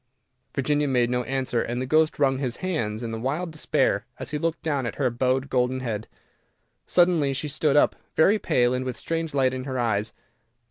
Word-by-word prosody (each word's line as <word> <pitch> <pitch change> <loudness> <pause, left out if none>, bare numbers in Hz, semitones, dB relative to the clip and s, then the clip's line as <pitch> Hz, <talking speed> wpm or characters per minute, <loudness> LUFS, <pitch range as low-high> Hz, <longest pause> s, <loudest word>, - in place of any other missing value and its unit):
Virginia 145 +2 +1
made 125 -3 +2
no 125 0 +1
answer, 130 -3 -1
and 120 +1 -3
the 130 - -2
ghost 155 +4 +2
wrung 135 -2 +2
his 125 -4 -1
hands 120 -12 -2
in 115 -1 -4
wild 155 +7 -2
despair 130 -9 +1
as - - -6
he 150 - -2
looked 165 +1 -2
down 140 -6 -1
at - - -5
her 130 -4 +1
bowed 130 +3 0
golden 130 0 0
head. 110 -3 -3 0.8
Suddenly 175 -6 +3
she 140 +3 -3
stood 150 0 +1
up, - - +4 0.2
very 200 +7 +4
pale, 125 -9 +2
and 125 0 -1
with 130 -2 -4
a - - -17
strange 165 -2 -3
light 130 -2 +3
in 130 0 -4
her 130 -2 -3
eyes. 110 -3 0
130 Hz, 200 wpm, -25 LUFS, 125-150 Hz, 0.8 s, up